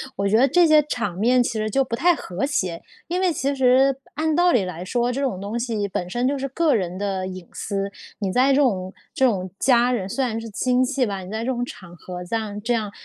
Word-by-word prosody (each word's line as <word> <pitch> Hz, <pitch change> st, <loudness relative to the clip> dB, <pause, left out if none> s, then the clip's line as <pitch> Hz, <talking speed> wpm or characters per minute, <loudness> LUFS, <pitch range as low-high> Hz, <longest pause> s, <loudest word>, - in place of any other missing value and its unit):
我 200 Hz, 0 st, 0 dB
觉 215 Hz, +3 st, +3 dB
得 270 Hz, -, +5 dB
这 345 Hz, +5 st, +4 dB
些 305 Hz, -1 st, +6 dB
场 230 Hz, -11 st, -3 dB
面 245 Hz, +3 st, +4 dB
其 -, -, -2 dB
实 215 Hz, 0 st, -1 dB
就 270 Hz, +5 st, +2 dB
不 230 Hz, -2 st, -3 dB
太 350 Hz, +5 st, +3 dB
和 185 Hz, 0 st, -5 dB
谐， 185 Hz, -, -2 dB, 0.3 s
因 360 Hz, +2 st, 0 dB
为 365 Hz, -2 st, +3 dB
其 280 Hz, -1 st, -1 dB
实 265 Hz, +1 st, +4 dB, 0.2 s
按 315 Hz, 0 st, 0 dB
道 350 Hz, 0 st, +4 dB
理 220 Hz, -9 st, +3 dB
来 180 Hz, -1 st, -6 dB
说， 240 Hz, +5 st, 0 dB
这 270 Hz, +3 st, -3 dB
种 250 Hz, -9 st, -1 dB
东 210 Hz, +4 st, -4 dB
西 220 Hz, -4 st, -2 dB
本 180 Hz, -1 st, -4 dB
身 240 Hz, +5 st, 0 dB
就 285 Hz, -, +1 dB
是 275 Hz, -, -2 dB
个 300 Hz, +2 st, +1 dB
人 185 Hz, -4 st, -1 dB
的 195 Hz, -2 st, -2 dB
隐 185 Hz, -2 st, -8 dB
私， 200 Hz, 0 st, -3 dB, 0.3 s
你 195 Hz, -3 st, -1 dB
在 260 Hz, +4 st, +3 dB
这 -, -, +4 dB
种 190 Hz, -9 st, +1 dB, 0.2 s
这 265 Hz, -, -1 dB
种 190 Hz, -7 st, +1 dB
家 245 Hz, -1 st, +4 dB
人 195 Hz, -6 st, -2 dB
虽 265 Hz, +5 st, 0 dB
然 225 Hz, -2 st, -3 dB
是 225 Hz, -, -7 dB
亲 250 Hz, +4 st, +1 dB
戚 260 Hz, -1 st, +1 dB
吧， 200 Hz, -2 st, -3 dB
你 185 Hz, 0 st, -9 dB
在 220 Hz, +1 st, -3 dB
这 260 Hz, -, 0 dB
种 245 Hz, -1 st, -2 dB
场 180 Hz, -7 st, -9 dB
合 180 Hz, +1 st, -8 dB
这 205 Hz, +6 st, -3 dB
样 210 Hz, -2 st, -3 dB
这 240 Hz, +3 st, -1 dB
样 215 Hz, -3 st, -1 dB
235 Hz, 275 characters per minute, -23 LUFS, 195-265 Hz, 0.3 s, 些